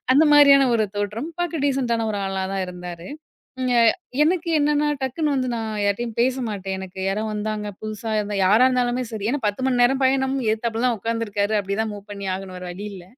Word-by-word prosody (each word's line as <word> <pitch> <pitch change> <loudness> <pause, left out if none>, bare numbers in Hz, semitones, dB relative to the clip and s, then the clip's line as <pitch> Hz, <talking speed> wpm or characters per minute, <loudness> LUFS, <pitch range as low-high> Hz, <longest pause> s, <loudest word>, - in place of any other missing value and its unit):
அந்த 305 - +6
மாரியான 280 -2 +7
ஒரு 220 -2 +2
தோற்றம். 210 +8 -3
பாக்க 340 -3 -2
டீசென்ட்டான 240 -5 0
ஒரு 205 - -2
ஆளா 195 0 -2
தான் 195 -1 -1
இருந்தாரு. 180 -1 -8 0.5
இங்க 255 -1 +1 0.5
எனக்கு 340 +1 +1
என்னென்னா, 295 0 +2 0.2
டக்குனு 295 +3 -1
வந்து 255 -1 -1
நான் 225 -1 -3 0.2
யார்ட்டேயும் 225 +3 -2
பேசமாட்டேன். 220 -7 -1
எனக்கு 190 0 -8
யாரோ 210 +3 -1
வந்தாங்க, 210 0 -3
புதுசா 215 +1 -5
இருந்தா, 205 -1 -3
யாரா 220 +6 +5
இருந்தாலுமே 250 0 0
சரி. 210 -1 -3
ஏன்னா 290 - -2
10 205 +5 -2
மணி 245 -2 +2
நேரம் 265 +2 +2
பயணம். 265 0 +2
எதிர்த்தாப்ல 225 +2 -1
தான் 240 -2 0
உட்காந்துருக்காரு. 220 -1 -1
அப்படிதான் 205 +3 -2
மூவ் 205 0 -11
பண்ணி 200 -1 -6
ஆகணும். 190 -1 -8
வேற 180 - -8
வழி 195 +4 -7
இல்ல. 185 -2 -10
225 Hz, 185 wpm, -22 LUFS, 200-260 Hz, 0.5 s, மாரியான